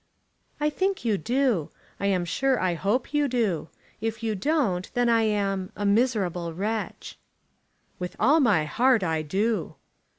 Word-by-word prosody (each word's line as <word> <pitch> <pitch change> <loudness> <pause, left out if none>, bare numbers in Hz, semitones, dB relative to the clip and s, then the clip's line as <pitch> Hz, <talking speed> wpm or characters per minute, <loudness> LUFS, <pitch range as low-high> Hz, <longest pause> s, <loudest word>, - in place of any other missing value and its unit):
"I 300 0 +1
think 380 -4 -1
you 220 -3 +2
do. 240 - +1 0.3
I 200 - 0
am 185 -3 +1
sure 265 +9 +1
I 185 -2 +1
hope 205 - -1
you 295 -1 +2
do. 215 - -1 0.3
If 225 0 -3
you 220 -1 0
don't, 205 - 0
then 245 -1 +2
I 230 -1 +4
am 200 -3 0
a 205 - -3
miserable 200 -7 +1
wretch." 215 +4 -4 0.8
"With 180 0 -5
all 285 +9 +5
my 205 - +3
heart 240 +7 +3
I 160 -2 0
do." 205 +9 -1
215 Hz, 155 wpm, -26 LUFS, 185-250 Hz, 0.8 s, all